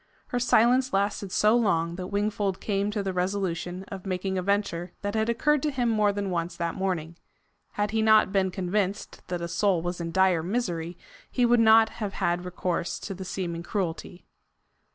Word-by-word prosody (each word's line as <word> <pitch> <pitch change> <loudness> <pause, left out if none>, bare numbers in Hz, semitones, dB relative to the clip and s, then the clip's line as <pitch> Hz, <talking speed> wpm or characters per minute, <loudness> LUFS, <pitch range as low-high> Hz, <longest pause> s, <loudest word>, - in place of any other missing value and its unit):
Her 245 - -1
silence 250 +2 +3
lasted 200 0 0
so 210 +4 +4
long 170 -8 +1
that 180 0 -5
Wingfold 205 -1 -1
came 200 -1 -1
to 210 -1 -2
the 190 -1 -2
resolution 180 -1 -2
of 195 -2 -7
making 190 0 -2
a 185 - 0
venture 185 -3 -1
that 205 0 -2
had 220 +1 0
occurred 285 +5 +2
to 300 - 0
him 250 -4 0
more 210 -2 +3
than 200 -1 -3
once 170 0 -2
that 170 -1 -2
morning. 170 -4 -3 0.6
Had 205 0 -1
he 220 0 +1
not 220 -2 +5
been 190 -1 +2
convinced 190 +2 -2
that 180 -1 -3
a 170 - -2
soul 180 -1 +1
was 175 0 -3
in 165 0 -4
dire 190 -2 +3
misery, 175 -4 -2 0.3
he 245 - +2
would 240 0 +4
not 220 0 +6
have 210 -3 -5
had 175 +1 -1
recourse 180 -1 -2
to 200 - -6
the 190 0 -7
seeming 175 -2 -4
cruelty. 175 -2 -4
195 Hz, 190 wpm, -27 LUFS, 175-215 Hz, 0.6 s, not